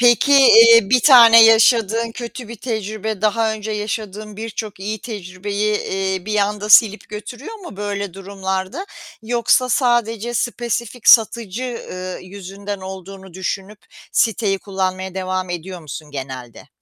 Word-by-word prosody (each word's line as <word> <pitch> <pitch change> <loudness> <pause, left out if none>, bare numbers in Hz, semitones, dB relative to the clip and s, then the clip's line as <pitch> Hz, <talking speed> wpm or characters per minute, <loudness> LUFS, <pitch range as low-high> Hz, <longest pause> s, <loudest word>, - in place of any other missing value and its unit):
Peki, 245 +3 +4
eee, 230 -5 +7
bir 250 - +4
tane 230 -4 +8
yaşadığın 225 0 +3
kötü 240 0 -8
bir 235 - -8
tecrübe, 215 -2 -5
daha 220 +1 +1
önce 215 0 -6
yaşadığın 210 0 -5
birçok 215 -2 -7
iyi 210 +2 -5
tecrübeyi, 205 0 -4
eee, 190 -1 -3
bir 215 0 -2
anda 205 +1 -1
silip 215 0 +5
götürüyor 245 - -8
mu 350 - -11
böyle 200 -2 -4
durumlarda? 195 - -5 0.4
Yoksa 240 +2 +1
sadece 240 -2 0
spesifik 235 0 -3
satıcı, 225 -1 +4
eee, 185 -7 -6
yüzünden 200 +1 -8
olduğunu 190 0 -10
düşünüp 195 +2 -5 0.3
siteyi 210 -3 +1
kullanmaya 190 -1 -4
devam 185 -1 -3
ediyor 175 +1 -6
musun 155 0 -9
genelde? 130 -4 -8
210 Hz, 130 wpm, -19 LUFS, 190-230 Hz, 0.4 s, tane